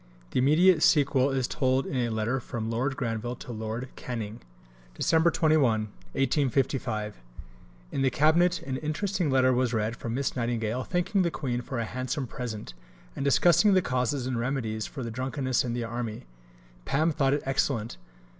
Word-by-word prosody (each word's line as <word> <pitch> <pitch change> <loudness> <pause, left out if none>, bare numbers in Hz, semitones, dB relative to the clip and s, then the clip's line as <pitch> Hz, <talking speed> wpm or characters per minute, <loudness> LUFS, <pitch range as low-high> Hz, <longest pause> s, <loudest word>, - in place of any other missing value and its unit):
The - - +1
immediate 155 +5 +5
sequel 140 -3 +4
is 135 -2 0
told 130 0 +1
in - - -4
a 120 -2 +1
letter 110 +4 -1
from 115 -2 -4
Lord 130 +4 -1
Granville 115 0 -2
to 125 - -9
Lord 110 +3 -4
Canning: 115 -3 -5 0.6
Dec. 165 +1 +3
21. 135 -10 +2 0.4
In 105 - -3
the 135 - +3
Cabinet 170 +6 +3
an 130 -1 -3
interesting 175 +4 -1
letter 130 -1 +4
was 125 -1 +1
read 110 +1 -1
from 115 -1 -4
Miss 140 +1 -1
Nightingale 120 0 -1
thanking 180 - 0
the 175 - +2
Queen 125 -6 -3
for 130 +1 -5
a 115 - -1
handsome 130 +4 -3
present, 110 - -6 0.4
and - - -3
discussing 175 +7 +5
the 185 - +4
causes 125 +1 -1
and 125 -2 -1
remedies 115 -4 -2
for 135 - -7
the 115 - -4
drunkenness 130 +1 -1
in 120 -2 -3
the 120 0 -2
army. 115 - -5 0.6
Pam 155 - +1
thought 135 -2 +2
it 145 - -3
excellent. 130 - -1
130 Hz, 165 wpm, -28 LUFS, 115-140 Hz, 0.6 s, immediate